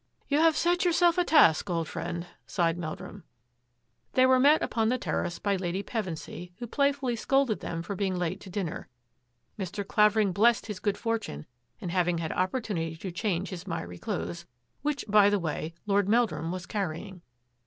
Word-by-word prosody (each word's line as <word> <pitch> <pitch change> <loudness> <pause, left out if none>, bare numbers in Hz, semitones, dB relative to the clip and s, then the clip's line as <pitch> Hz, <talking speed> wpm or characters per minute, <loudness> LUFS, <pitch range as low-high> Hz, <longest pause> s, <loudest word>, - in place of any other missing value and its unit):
" - - -40
You 290 +1 +3
have 320 -1 +4
set 350 +1 +2
yourself 345 0 +4
a - - +4
task, 205 - +5
old 165 -2 -1
friend," 170 +1 -4 0.2
sighed 170 -3 +1
Meldrum. 175 +3 -7 0.9
They 255 - +5
were 260 0 +5
met 290 +4 +5
upon 225 -2 +1
the 255 - +1
terrace 175 -7 -2
by 200 -1 0
Lady 185 +1 -2
Pevensy, 180 -5 -5
who 240 - -5
playfully 280 0 +1
scolded 270 -1 +1
them 165 0 -4
for 200 - -4
being 190 -1 -1
late 180 +2 -2
to 195 - -10
dinner. 185 -3 -4 0.7
Mr. 195 +1 -4
Clavering 210 -1 +4
blessed 220 +5 +3
his 210 -4 -5
good 205 +1 -1
fortune 225 - -3 0.3
in 180 - -5
having 175 -1 +1
had 165 -1 -3
opportunity 185 -4 -1
to 180 +3 -6
change 185 0 -1
his 185 +1 -7
miry 90 - -5
clothes, 85 +1 -4 0.3
which, 295 -2 -2
by 205 -1 +6
the 205 - +2
way, 160 -2 -3
Lord 200 -1 +2
Meldrum 220 -7 +1
was 180 -1 -5
carrying. 190 -1 -4
195 Hz, 175 wpm, -28 LUFS, 170-230 Hz, 0.9 s, by